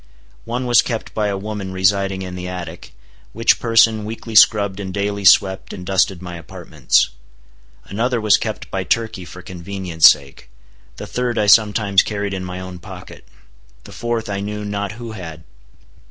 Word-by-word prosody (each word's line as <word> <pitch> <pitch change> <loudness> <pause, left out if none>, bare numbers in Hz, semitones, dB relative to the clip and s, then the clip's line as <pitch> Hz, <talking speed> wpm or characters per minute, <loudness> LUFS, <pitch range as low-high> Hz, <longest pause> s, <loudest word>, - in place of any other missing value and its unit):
One 125 +2 -3
was 120 -1 +5
kept 115 -2 -5
by 105 -1 0
a 100 -1 -2
woman 100 -1 -5
residing 95 0 +1
in 90 -1 -7
the 90 0 -6
attic, 90 -2 -8 0.4
which 115 +3 +3
person 115 -2 +3
weekly 115 +1 -7
scrubbed 100 -2 +5
and 95 -2 -5
daily 100 +1 -2
swept 95 0 +4
and 90 - -8
dusted 95 -1 +1
my 90 -1 -7
apartments. 80 -5 0 0.7
Another 115 +4 -1
was 105 -3 +4
kept - - -5
by - - -2
Turkey 110 -5 -2
for 90 +1 -11
convenience 90 -2 +3
sake. 70 -3 -2 0.5
The - - -8
third 125 -1 -2
I 105 - +2
sometimes 105 -2 +4
carried 100 -2 -3
in 95 -1 -4
my 90 0 -6
own 95 -1 -8
pocket. 75 - -12 0.6
The - - -13
fourth 120 -1 -3
I 100 -1 -3
knew 105 +1 -5
not 100 0 -3
who 115 0 -8
had. 80 -7 -9
100 Hz, 170 wpm, -19 LUFS, 90-110 Hz, 0.7 s, was